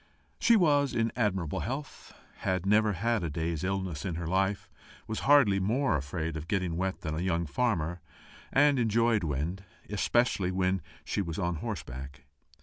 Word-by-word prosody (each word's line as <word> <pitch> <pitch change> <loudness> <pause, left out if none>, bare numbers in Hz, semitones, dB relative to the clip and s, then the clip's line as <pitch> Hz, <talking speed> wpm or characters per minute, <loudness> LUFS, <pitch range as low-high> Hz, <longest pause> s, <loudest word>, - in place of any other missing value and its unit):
She 235 - +5
was 145 -8 +3
in 115 0 +1
admirable 95 -9 0
health, 135 +4 -5 0.3
had 95 -1 -1
never 105 +1 +4
had 115 +2 0
a 85 - -1
day's 80 +1 -2
illness 95 -5 -2
in 90 -4 -3
her 85 +1 -4
life, 95 +3 0 0.4
was 110 - -3
hardly 125 -10 +6
more 115 - +1
afraid 80 +3 -3
of 80 +1 -6
getting 90 -4 -1
wet 95 +2 -2
than 80 -5 -3
a 80 - -2
young 85 -2 0
farmer, 85 - -1 0.5
and 145 -1 +4
enjoyed 115 -2 +2
wind, 80 +6 -2 0.3
especially 105 -2 +1
when 95 0 0 0.2
she - - -1
was 85 -4 -4
on 85 -3 -1
horseback. 70 - -6
95 Hz, 160 wpm, -29 LUFS, 85-115 Hz, 0.5 s, hardly